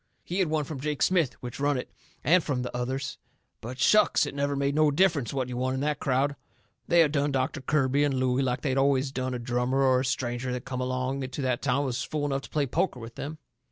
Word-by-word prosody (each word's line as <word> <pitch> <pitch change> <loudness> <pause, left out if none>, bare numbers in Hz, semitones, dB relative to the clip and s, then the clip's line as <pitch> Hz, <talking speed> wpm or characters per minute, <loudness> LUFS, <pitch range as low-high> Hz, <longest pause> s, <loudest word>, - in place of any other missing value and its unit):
He 180 +3 -3
had 185 - +3
won 155 -1 0
from 145 -1 -6
Jake 150 +1 -1
Smith, 170 -8 +2
which 120 +1 -6
run 145 0 +2
it, 125 - -6 0.3
and 175 +2 +4
from 130 -4 -1
the 125 - -5
others. 130 +2 -3 0.4
But 125 +3 -7
shucks! 210 +7 +4
it - - -5
never 140 0 -1
made 140 0 0
no 155 0 +4
difference 145 - +2
what 130 -2 -1
you 125 -1 -5
won 130 +1 0
in - - -2
that 150 0 0
crowd. 140 +2 +1 0.5
They 170 0 +5
had 155 -3 +3
done 145 -1 +1
Doctor 135 +2 -1
Kirby 140 0 +2
and 145 -2 +1
Looey 130 0 +1
like 125 -2 -1
they 135 - 0
always 135 0 +2
done 130 -1 -2
a - - -1
drummer 125 +2 0
or 130 -1 +4
a - - 0
stranger 125 -1 -2
that 125 -1 -5
come 130 -1 -3
along 130 +1 -2
to 130 +2 -4
that 125 -2 0
town 135 -1 +1
and - - -1
was 125 -3 -2
fool 150 -1 -2
enough 135 -1 -1
to - - -11
play 150 -2 0
poker 135 +1 -1
with 115 0 -9
them. 155 +6 -6
135 Hz, 250 wpm, -27 LUFS, 130-145 Hz, 0.5 s, They